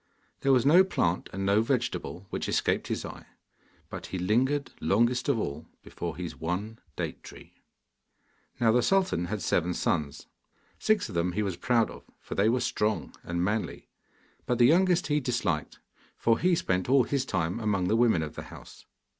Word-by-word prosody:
There 135 Hz, -, +2 dB
was 130 Hz, -1 st, +4 dB
no 170 Hz, +6 st, +7 dB
plant 90 Hz, -, -1 dB
and 95 Hz, +1 st, -3 dB
no 100 Hz, +2 st, +4 dB
vegetable 115 Hz, -6 st, -2 dB
which -, -, -3 dB
escaped -, -, 0 dB
his -, -, -3 dB
eye, -, -, -10 dB, 0.6 s
but -, -, -7 dB
he 95 Hz, -, -4 dB
lingered 125 Hz, +10 st, +1 dB
longest 120 Hz, +5 st, +2 dB
of 140 Hz, -, +3 dB
all 75 Hz, -7 st, -4 dB, 0.2 s
before 85 Hz, -2 st, -6 dB
his 90 Hz, -2 st, -5 dB
one 100 Hz, +7 st, -4 dB, 0.2 s
date -, -, -4 dB
tree. -, -, -13 dB, 1.1 s
Now 115 Hz, -2 st, +4 dB
the 120 Hz, +2 st, +4 dB
sultan 190 Hz, -, +1 dB
had 105 Hz, +1 st, -4 dB
seven 90 Hz, 0 st, +1 dB
sons. 75 Hz, -4 st, -1 dB, 0.5 s
Six 215 Hz, -2 st, +2 dB
of -, -, -9 dB
them 85 Hz, +1 st, 0 dB
he 105 Hz, +3 st, 0 dB
was 95 Hz, -3 st, -2 dB
proud 115 Hz, +5 st, +1 dB
of, -, -, -13 dB
for -, -, -8 dB
they 105 Hz, +3 st, +3 dB
were 125 Hz, +2 st, +1 dB
strong 105 Hz, 0 st, -1 dB
and 85 Hz, 0 st, -2 dB
manly, 105 Hz, +3 st, -2 dB, 0.6 s
but 125 Hz, -, +1 dB
the 120 Hz, -, +6 dB
youngest 175 Hz, +4 st, +4 dB
he 150 Hz, -1 st, +1 dB
disliked, 120 Hz, -, -2 dB, 0.4 s
for 115 Hz, 0 st, +2 dB
he 180 Hz, 0 st, +3 dB
spent 95 Hz, -, -1 dB
all 135 Hz, -1 st, +5 dB
his 135 Hz, +2 st, -1 dB
time 90 Hz, -3 st, -2 dB
among 100 Hz, -5 st, 0 dB
the 110 Hz, -, +2 dB
women 115 Hz, -8 st, +3 dB
of 75 Hz, -, -6 dB
the -, -, -8 dB
house. -, -, -13 dB
110 Hz, 180 wpm, -28 LUFS, 90-130 Hz, 1.1 s, no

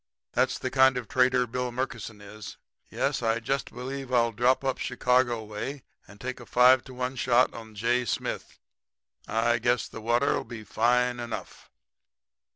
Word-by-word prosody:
That's -, -, +1 dB
the 130 Hz, -, -4 dB
kind 130 Hz, -1 st, +5 dB
of 120 Hz, -3 st, -4 dB
trader 125 Hz, -1 st, +3 dB
Bill 125 Hz, +1 st, -3 dB
Murkison 115 Hz, -4 st, -5 dB
is. 105 Hz, +1 st, -10 dB, 0.3 s
Yes, -, -, -1 dB
I 115 Hz, 0 st, +1 dB
jist 135 Hz, +4 st, -2 dB
believe 130 Hz, +1 st, -6 dB
I'll 120 Hz, -2 st, +3 dB
drop 125 Hz, +5 st, +2 dB
up 135 Hz, -1 st, -1 dB
Chicago 125 Hz, -2 st, +1 dB
way 110 Hz, +6 st, -6 dB, 0.2 s
and 105 Hz, 0 st, -15 dB
take 130 Hz, +2 st, -5 dB
a -, -, -12 dB
5 125 Hz, +1 st, +6 dB
to 130 Hz, -, -11 dB
1 125 Hz, +1 st, -3 dB
shot 125 Hz, 0 st, +3 dB
on 110 Hz, -2 st, -10 dB
J. 120 Hz, +4 st, +1 dB
Smith. -, -, -3 dB, 0.7 s
I 115 Hz, +2 st, +1 dB
guess 120 Hz, +1 st, +1 dB
the 115 Hz, -, -9 dB
water'll 120 Hz, +5 st, +1 dB
be 110 Hz, -1 st, -9 dB
fine 125 Hz, +3 st, +1 dB
enough.' 120 Hz, -1 st, -7 dB
120 Hz, 160 wpm, -27 LUFS, 115-130 Hz, 0.7 s, 5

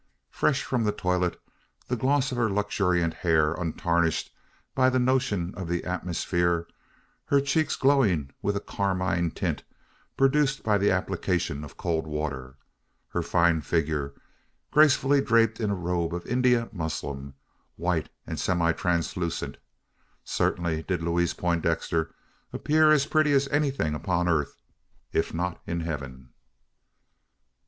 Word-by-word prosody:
Fresh 140 Hz, -2 st, +1 dB
from 125 Hz, -3 st, -1 dB
the 105 Hz, -, +2 dB
toilette, 90 Hz, -3 st, -1 dB, 0.5 s
the 125 Hz, -, 0 dB
gloss 135 Hz, +3 st, +1 dB
of 125 Hz, -, -3 dB
her 115 Hz, -2 st, +2 dB
luxuriant 90 Hz, -4 st, +1 dB
hair 80 Hz, -2 st, +2 dB
untarnished 85 Hz, -1 st, 0 dB, 0.4 s
by 130 Hz, 0 st, +4 dB
the 130 Hz, -, +1 dB
notion 125 Hz, -8 st, +1 dB
of 90 Hz, -1 st, -6 dB
the 85 Hz, 0 st, -1 dB
atmosphere; 85 Hz, -1 st, -1 dB, 0.6 s
her 140 Hz, -, +3 dB
cheeks 140 Hz, +2 st, +1 dB
glowing 105 Hz, -, +2 dB
with 100 Hz, -, 0 dB
a -, -, 0 dB
carmine 95 Hz, -4 st, -1 dB
tint, -, -, -2 dB, 0.6 s
produced 135 Hz, 0 st, +2 dB
by 105 Hz, -2 st, +2 dB
the 100 Hz, -, +3 dB
application 90 Hz, -5 st, -1 dB
of 75 Hz, -, -11 dB
cold 80 Hz, -2 st, -1 dB
water; 70 Hz, -4 st, -4 dB, 0.5 s
her -, -, -1 dB
fine 85 Hz, -2 st, +2 dB
figure, 75 Hz, -3 st, -1 dB, 0.6 s
gracefully 145 Hz, -2 st, +5 dB
draped 115 Hz, -2 st, +3 dB
in 110 Hz, -3 st, 0 dB
a 100 Hz, -, 0 dB
robe 85 Hz, -1 st, -1 dB
of 90 Hz, -, -6 dB
India 125 Hz, -1 st, +2 dB
muslin 70 Hz, -5 st, -5 dB, 0.4 s
white 85 Hz, -2 st, -1 dB, 0.2 s
and -, -, -5 dB
semi 85 Hz, -2 st, +2 dB
translucent 85 Hz, -1 st, -2 dB, 0.7 s
certainly 85 Hz, -2 st, 0 dB
did 90 Hz, 0 st, -2 dB
Louise 85 Hz, 0 st, +1 dB
Poindexter 85 Hz, -1 st, 0 dB, 0.4 s
appear 155 Hz, +1 st, +3 dB
as 145 Hz, -2 st, +4 dB
pretty 155 Hz, -2 st, +2 dB
as 140 Hz, 0 st, +3 dB
anything 140 Hz, -, 0 dB
upon 90 Hz, +3 st, 0 dB
earth 80 Hz, -4 st, 0 dB, 0.6 s
if 80 Hz, -, +1 dB
not 90 Hz, +1 st, -3 dB
in 85 Hz, 0 st, -2 dB
heaven. 70 Hz, -6 st, -6 dB
90 Hz, 130 wpm, -27 LUFS, 80-120 Hz, 0.7 s, gracefully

